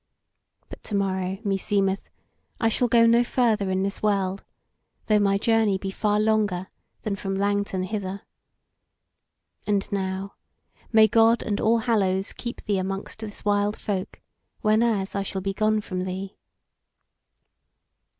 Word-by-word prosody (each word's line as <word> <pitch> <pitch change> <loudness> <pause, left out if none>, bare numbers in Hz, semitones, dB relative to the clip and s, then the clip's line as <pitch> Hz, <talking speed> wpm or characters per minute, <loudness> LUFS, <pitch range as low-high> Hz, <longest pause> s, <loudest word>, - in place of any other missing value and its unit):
But - - -11
to 210 - -3
morrow, 190 -1 -1
meseemeth, 195 -1 0 0.5
I 225 - +3
shall 245 +2 +2
go 230 0 +5
no 235 +1 +5
further 225 -5 +1
in 190 0 0
this 200 0 -3
world, 195 -2 0 0.6
though 215 -1 +3
my 200 -1 +3
journey 220 -2 +2
be 195 0 -5
far 210 +1 +1
longer 210 -4 +1 0.3
than 210 -2 -1
from 195 0 -3
Langton 200 -1 0
hither. 195 0 -4 1.4
And 200 -2 +1
now 190 0 -3 0.6
may 220 -1 +7
God 225 +2 +4
and 205 -1 -2
All 230 +2 +4
Hallows 200 -5 0
keep 240 0 -6
thee 200 -2 0
amongst 195 +3 -4
this 215 -2 -8
wild 205 0 +1
folk, 190 -3 -4 0.4
whenas 215 -2 +2
I 200 - -1
shall 195 0 -3
be 195 +1 -2
gone 215 +1 +1
from 185 -2 -4
thee." 190 +1 -5
200 Hz, 140 wpm, -25 LUFS, 195-215 Hz, 1.4 s, may